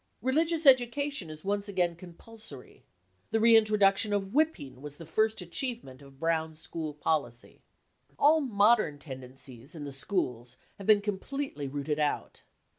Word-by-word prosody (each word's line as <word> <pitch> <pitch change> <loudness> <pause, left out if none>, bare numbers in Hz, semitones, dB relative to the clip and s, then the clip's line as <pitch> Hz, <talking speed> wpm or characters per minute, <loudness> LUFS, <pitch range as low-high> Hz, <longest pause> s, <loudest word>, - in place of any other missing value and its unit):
Religious 320 +4 +1
education 265 - +3
is 155 +2 -10
once 200 +1 -1
again 175 -3 0
compulsory. 175 - -9 0.5
The 225 - +1
reintroduction 215 -2 +4
of 195 -1 -2
whipping 225 - 0
was 145 0 -8
the 165 - -11
first 220 +6 0
achievement 180 - -5
of 135 -1 -16
Brown 160 -1 0
school 155 -1 -6
policy. 145 -6 -3 0.6
All 310 +2 +5
modern 215 - +3
tendencies 130 -1 -8
in 155 - -7
the 140 -1 -6
schools 125 - -3 0.2
have 195 - -8
been 210 -2 +6
com 205 -2 -2
pletely 270 - -4
rooted 145 +1 -2
out. 150 -1 -2
185 Hz, 140 wpm, -29 LUFS, 145-225 Hz, 0.6 s, been